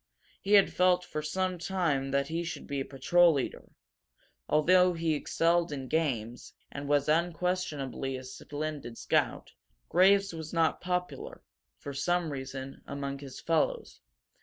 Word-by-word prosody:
He 200 - 0
had 200 -2 +6
felt 180 0 +3
for 155 - -4
some 185 +4 -2
time 165 -7 0
that 140 0 0
he 165 +1 -2
should 170 - -6
be 140 -1 -3
a 135 - -2
patrol 170 +5 +4
leader. 140 -3 -4 0.8
Although 180 +4 +5
he 165 -1 0
excelled 165 +2 +1
in 135 -2 -5
games, 125 -7 -2 0.2
and 140 0 -6
was 145 0 +2
unquestionably 160 -5 -1
a 130 - -8
splendid 145 -1 -6
scout, - - 0 0.4
Graves 195 +1 +4
was 160 0 -7
not 165 -2 +1
popular, 180 - -4 0.3
for 140 - -7
some 165 +4 0
reason, 135 0 -6
among 140 0 -4
his 135 -2 -9
fellows. 455 - -1
160 Hz, 140 wpm, -30 LUFS, 140-180 Hz, 0.8 s, had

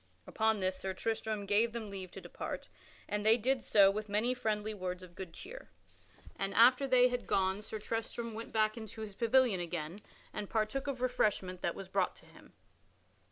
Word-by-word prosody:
Upon 220 0 +1
this 185 0 0
Sir 190 -1 -3
Tristram 220 -1 -2
gave 215 +3 +2
them 220 -3 -5
leave 190 -2 -6
to - - -8
depart, - - -6 0.4
and 210 0 -2
they 220 +2 +6
did 255 +2 +1
so 200 -3 +6
with 210 +1 -4
many 215 +5 +2
friendly 215 -3 -1
words 185 -2 -4
of 180 -1 -12
good 185 -1 -7
cheer. - - -9 0.7
And 195 0 -3
after 250 +4 +6
they 250 -1 +6
had 245 0 -3
gone 190 +1 +1
Sir 215 - -5
Tristram 225 +2 -4
went 225 +1 -7
back 215 0 +2
into 220 0 -7
his 215 -2 -6
pavilion 230 -1 +3
again 170 +1 -4 0.3
and 210 -2 -4
partook 225 +5 -1
of 265 -3 -3
refreshment 205 -7 0
that 170 - -1
was 195 - -7
brought - - 0
to - - -15
him. - - -17
215 Hz, 190 wpm, -33 LUFS, 195-230 Hz, 0.7 s, they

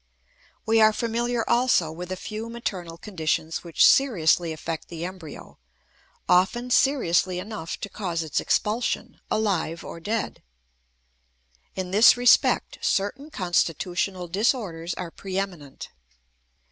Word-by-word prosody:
We 225 0 +3
are 215 0 +6
familiar 235 +1 -1
also 235 -9 +2
with 175 +3 -7
a - - -1
few 215 +4 -6
maternal 185 -8 -5
conditions 160 -4 -2
which 170 -2 +3
seriously 175 - +4
affect 160 +1 -5
the 170 0 -6
embryo, 180 -4 -10 0.7
often 240 +8 +2
seriously 185 -10 +2
enough 185 -3 -6
to - - -3
cause 180 -5 -3
its 155 - -1
expulsion, 220 +4 -1
alive 180 -6 -1
or - - -8
dead. 215 +5 -3 1.3
In 185 -1 -4
this 215 +5 +7
respect, 245 0 +3
certain 255 +10 -1
constitutional 180 - -1
disorders 185 -4 -1
are 175 -2 -6
preeminent. 185 -8 -5
190 Hz, 115 wpm, -25 LUFS, 170-225 Hz, 1.3 s, this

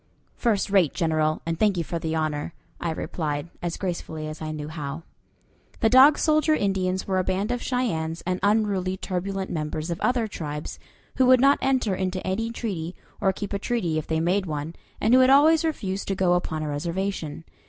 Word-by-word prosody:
"First 210 -4 0
rate, 185 -7 +3
General, 155 -2 0
and 165 0 -2
thank 205 -3 +3
you 170 - 0
for 170 +1 -4
the 160 0 -2
honor," 155 0 -2 0.2
I 170 - -2
replied, 155 -1 -3
as 175 -1 -3
gracefully 160 -4 -4
as 155 +1 -7
I 155 - -4
knew 150 -1 -5
how. 155 0 -6 0.8
The 225 - +4
Dog 270 +4 +8
Soldier 310 0 +3
Indians 190 -4 0
were 190 -1 +1
a - - +1
band 190 +5 -1
of 245 -1 -2
Cheyennes 165 -11 -2
and 185 +1 -1
unruly, 200 -3 +1
turbulent 190 +1 -3
members 155 +1 -3
of 170 - -4
other 245 -3 +1
tribes, 150 -7 -6 0.4
who 260 - +4
would 255 0 +7
not 275 +2 +5
enter 260 -6 +1
into 185 0 -2
any 220 +5 -1
treaty, 190 -8 -4 0.3
or 195 -2 +3
keep 205 +1 -6
a 200 - -1
treaty 185 -9 -1
if 155 - -8
they 160 0 0
made 185 +3 +1
one, 150 +1 -4 0.2
and 220 +3 +2
who 255 - +8
had 255 0 +6
always 310 +4 +6
refused 200 -12 -2
to 195 - 0
go 185 -1 +2
upon 160 -3 -1
a - - -3
reservation. 170 +1 -3
185 Hz, 195 wpm, -25 LUFS, 160-215 Hz, 0.8 s, Dog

